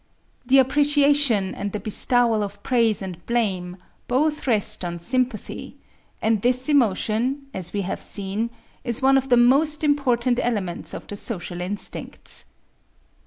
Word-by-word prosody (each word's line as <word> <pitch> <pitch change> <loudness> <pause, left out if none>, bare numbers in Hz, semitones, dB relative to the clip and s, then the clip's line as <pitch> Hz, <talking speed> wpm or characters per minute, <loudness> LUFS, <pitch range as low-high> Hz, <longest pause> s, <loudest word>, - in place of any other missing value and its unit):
The 265 +2 +5
appreciation 280 -6 +3
and 200 -1 -5
the 210 - -2
bestowal 225 +2 +2
of 205 0 -6
praise 230 -5 +1
and 180 -3 -8
blame 190 -7 -1 0.3
both 300 +4 0
rest 215 -3 +2
on 175 -1 -4
sympathy; 245 +4 -1 0.5
and 220 -2 +2
this 250 +2 +1
emotion, 250 +1 +1
as 180 -2 -5
we 205 - -2
have 190 - -4
seen, 205 +3 -2 0.3
is 240 0 -3
one 270 +1 +5
of 270 0 +1
the 245 - +5
most 290 +6 +3
important 255 -4 +1
elements 200 -8 -3
of - - -8
the 205 - -7
social 175 -5 -4
instincts. 195 +3 -3
235 Hz, 140 wpm, -23 LUFS, 200-265 Hz, 0.5 s, The